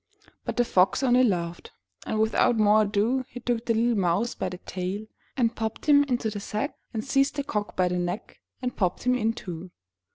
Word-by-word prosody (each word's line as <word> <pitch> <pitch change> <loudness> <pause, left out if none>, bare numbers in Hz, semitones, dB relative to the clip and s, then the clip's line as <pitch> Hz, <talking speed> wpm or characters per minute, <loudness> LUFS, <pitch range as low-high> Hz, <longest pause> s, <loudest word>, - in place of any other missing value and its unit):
But - - -3
the 245 - +3
Fox 190 +6 +3
only 250 0 +5
laughed, 175 -6 -1 0.3
and 220 - -1
without 220 +2 +3
more 215 0 +5
ado 215 +5 +1
he 245 - -9
took 240 -1 -2
the 230 - +2
little 235 +2 +2
mouse 200 +3 +1
by - - -3
the 180 - -7
tail, 185 +3 -4 0.3
and 235 -3 +2
popped 220 -1 -4
him 285 -1 +7
into 245 -5 -1
the 205 - -4
sack, 215 +8 -3 0.2
and 220 -1 -4
seized 275 +1 +2
the 285 - -1
Cock 210 -6 -3
by 185 -1 +2
the 180 0 -1
neck 175 +3 -4 0.2
and 250 -1 -2
popped 180 -3 -1
him 250 - +3
in 225 -2 +1
too. 180 -5 -7
220 Hz, 205 wpm, -26 LUFS, 190-245 Hz, 0.3 s, him